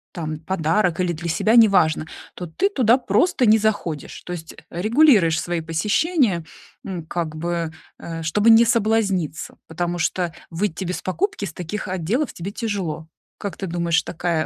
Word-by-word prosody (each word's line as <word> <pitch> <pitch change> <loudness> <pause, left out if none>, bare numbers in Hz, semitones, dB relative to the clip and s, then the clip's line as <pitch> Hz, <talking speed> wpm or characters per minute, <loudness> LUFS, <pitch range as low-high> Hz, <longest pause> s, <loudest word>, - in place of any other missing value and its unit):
там 155 -3 -4
подарок 170 +1 0
или 180 -1 +1
для 170 +1 -5
себя, 215 +7 +2
неважно, 195 -9 +5 0.3
то 180 - -6
ты 380 - 0
туда 250 - +4
просто 250 - +2
не 215 +1 +7
заходишь. 205 -9 -2
То 180 - -6
есть, 165 -2 -8
э, - - -16 0.2
регулируешь 215 - +4
свои 175 -1 -2
посещения, 205 - +1 0.4
м, 180 -5 -5
как 165 -2 -3
бы, 170 0 -2 0.3
э, 165 -1 -6
чтобы 205 +8 +2
не 225 +1 +7
соблазниться, 215 - 0
потому 175 +2 -3
что 175 +1 0 0.2
выйти 175 +1 -2
без 180 +1 -3
покупки 360 - -2
с 165 - -7
таких 180 +6 -5
отделов 190 - -1
тебе 180 +4 -6
тяжело. 190 -9 -4 0.3
Как 200 - -5
ты 195 - -4
думаешь, 170 -1 +1
такая 165 -2 -1
180 Hz, 160 wpm, -22 LUFS, 165-215 Hz, 0.4 s, не